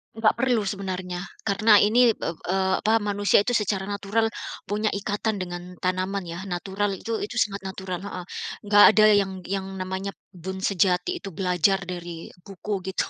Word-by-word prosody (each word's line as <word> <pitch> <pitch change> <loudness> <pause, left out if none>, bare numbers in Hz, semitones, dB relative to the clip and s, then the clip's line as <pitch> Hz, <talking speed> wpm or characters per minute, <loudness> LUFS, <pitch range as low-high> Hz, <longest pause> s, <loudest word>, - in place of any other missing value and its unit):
Enggak 225 -1 +3
perlu 245 -4 +2
sebenarnya, 185 -2 -4 0.2
karena 210 +1 +5
ini 235 +3 +5
ep - - -33
eee, 190 +3 0
apa 220 +1 +3
manusia 205 0 +3
itu 245 - -1
secara 205 -3 0
natural 205 +3 -1 0.3
punya 210 +1 -1
ikatan 205 +2 -2
dengan 180 0 -6
tanaman 185 +1 -1
ya 170 +1 -6
natural 195 +2 -2
itu 225 +3 -3
itu 210 +3 -5
sangat 200 -4 0
natural, 190 -2 -5
heeh. 185 -3 -6 0.4
Enggak 205 0 +7
ada 215 -1 +7
yang 200 -1 +2
yang 195 0 -2
namanya 190 +1 -3 0.3
berkebun 190 +2 -6
sejati 180 -2 +1
itu 195 -3 -8
belajar 185 +2 +2
dari 175 -2 -7 0.2
buku 195 -1 -5
gitu 190 - -2
195 Hz, 160 wpm, -25 LUFS, 185-205 Hz, 0.4 s, Enggak